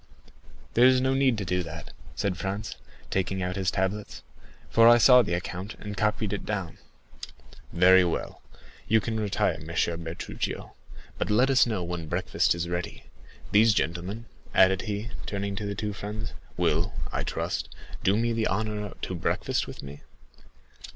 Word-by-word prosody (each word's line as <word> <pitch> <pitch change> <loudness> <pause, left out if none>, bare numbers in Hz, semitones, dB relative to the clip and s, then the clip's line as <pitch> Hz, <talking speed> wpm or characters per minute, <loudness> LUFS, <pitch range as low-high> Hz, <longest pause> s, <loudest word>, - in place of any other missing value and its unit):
"There 120 +2 +7
is 130 0 +5
no 130 +1 +2
need 135 -3 +3
to 100 - -3
do 90 0 0
that," 85 -1 -8 0.2
said 95 +7 -1
Franz, 100 +3 -4 0.4
taking 95 0 -1
out 90 0 -2
his 95 -2 0
tablets; 100 +2 -2 0.4
"for 115 0 +5
I 120 - +8
saw 125 +1 +8
the 90 -7 -1
account, 90 +3 -5
and 105 -1 -7
copied 105 0 0
it 100 - -3
down." 95 -6 -4 0.9
"Very 90 +2 +6
well, 85 - -3 0.5
you 110 +1 +4
can 110 +2 -3
retire, 105 -3 0
M. - - -10
Bertuccio; - - -10 0.4
I 80 - -5
need - - -2
you - - -4
no - - -8 0.6
longer. - - 0
Let 125 +4 +4
us 130 -2 +5
know 105 -6 -1
when 85 -2 -4
breakfast 75 - +1
is 85 0 -3
ready. 85 0 -4 0.5
These 105 +1 +5
gentlemen," 90 +7 -2 0.3
added 95 0 +5
he, 105 +3 -3 0.2
turning 100 -1 -3
to 105 - -3
the 100 - -3
two 105 0 -3
friends, 105 +3 -6 0.2
"will, - - +1 0.2
I - - -2
trust, - - -3 0.3
do 100 +2 +3
me 115 +1 +1
the 115 -1 +1
honor 105 0 -2
to - - -3
breakfast 85 - -1
with - - -9
me?" 70 +1 -9
100 Hz, 175 wpm, -27 LUFS, 90-110 Hz, 0.9 s, I